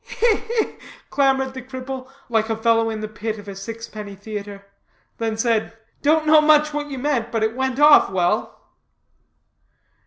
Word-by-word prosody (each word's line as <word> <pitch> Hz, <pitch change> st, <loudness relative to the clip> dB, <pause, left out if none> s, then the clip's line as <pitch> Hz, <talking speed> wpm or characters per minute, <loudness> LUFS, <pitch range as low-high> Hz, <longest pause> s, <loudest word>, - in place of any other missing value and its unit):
"Hi, 460 Hz, -1 st, +3 dB
hi!" 455 Hz, -1 st, -1 dB, 0.4 s
clamored 270 Hz, -1 st, +2 dB
the 260 Hz, -, -7 dB
cripple, 260 Hz, 0 st, -7 dB, 0.2 s
like 225 Hz, -1 st, 0 dB
a 225 Hz, -, -1 dB
fellow 225 Hz, 0 st, +2 dB
in 220 Hz, -1 st, -4 dB
the 215 Hz, -, -3 dB
pit 215 Hz, +1 st, -5 dB
of 205 Hz, -1 st, -12 dB
a 200 Hz, -, -7 dB
sixpenny 210 Hz, 0 st, -8 dB
theatre, 200 Hz, -1 st, -8 dB, 0.5 s
then 225 Hz, -1 st, -2 dB
said, 225 Hz, -1 st, 0 dB, 0.2 s
"don't 310 Hz, +2 st, +3 dB
know 310 Hz, 0 st, +6 dB
much 300 Hz, 0 st, +4 dB
what 295 Hz, 0 st, -3 dB
you 275 Hz, -, -5 dB
meant, 250 Hz, -4 st, -1 dB
but 225 Hz, -2 st, 0 dB
it 220 Hz, +1 st, 0 dB
went 265 Hz, 0 st, -1 dB
off 295 Hz, 0 st, +7 dB
well." 185 Hz, +3 st, -1 dB
230 Hz, 165 wpm, -21 LUFS, 215-280 Hz, 0.5 s, off